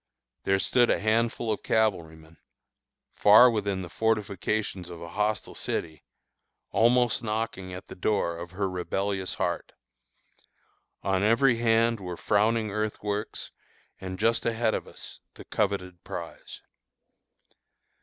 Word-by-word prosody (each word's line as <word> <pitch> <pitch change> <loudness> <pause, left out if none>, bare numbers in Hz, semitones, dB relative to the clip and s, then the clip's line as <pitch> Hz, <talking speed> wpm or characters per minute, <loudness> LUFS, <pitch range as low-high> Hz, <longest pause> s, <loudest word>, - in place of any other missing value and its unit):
There 95 - +3
stood 120 +5 +3
a - - +2
handful 115 +1 +1
of - - -6
cavalrymen, 80 -7 -1 0.8
far 110 +4 +7
within 100 -4 -1
the - - -6
fortifications 105 -3 -1
of 85 -1 -8
a 85 0 -8
hostile 105 +2 -1
city, 80 -2 -4 0.7
almost 120 +1 +3
knocking 110 -4 -3
at 90 +1 -8
the - - -9
door 90 -3 0
of 85 +1 -7
her 95 +2 -2
rebellious 95 +1 -2
heart. - - -2 1.3
On 95 -1 +1
every 115 +4 +4
hand 115 0 +2
were 90 -2 -6
frowning 110 +1 +1
earthworks, 105 0 -3 0.5
and 95 -1 -6
just 115 +3 +2
ahead 115 -1 +1
of - - -3
us - - -10 0.2
the - - -12
coveted 95 -4 -2
prize. - - -8
105 Hz, 125 wpm, -27 LUFS, 95-115 Hz, 1.3 s, far